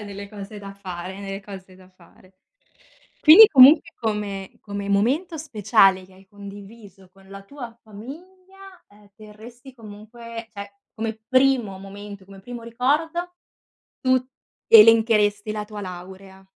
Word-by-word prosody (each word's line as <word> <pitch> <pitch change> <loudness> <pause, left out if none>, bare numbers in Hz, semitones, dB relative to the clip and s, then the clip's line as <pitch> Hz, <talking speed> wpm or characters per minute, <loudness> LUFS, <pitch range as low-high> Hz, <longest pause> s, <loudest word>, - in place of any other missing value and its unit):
È - - -9
nelle 200 0 -9
cose 205 0 -10
da 200 -1 -10
fare, 185 -1 -8
nelle 195 0 -7
cose 190 -2 -12
da 185 0 -19
fare. 185 +1 -24 0.9
Quindi 345 +8 +9
comunque 300 +1 +6
come 205 -3 -4
come 200 -1 -7
momento 275 - 0
speciale 210 -9 +2
che 185 - -22
hai 190 +1 -20
condiviso 200 -1 -14
con 195 0 -21
la 195 0 -11
tua 235 0 -11
famiglia, 370 - -14
ehm, 205 0 -22
terresti 230 +5 -15
comunque, 230 +1 -11
cioè 200 -1 -10 0.2
come 220 0 -5
primo 255 -6 +1
momento, 200 0 -11
come 195 0 -15
primo 240 +2 -10
ricordo, 315 +9 -2 0.7
tu 255 -1 +2 0.5
elencheresti 215 -2 +5
la 210 -1 -5
tua 210 -1 -10
laurea. 190 +1 -11
210 Hz, 135 wpm, -22 LUFS, 195-245 Hz, 0.9 s, Quindi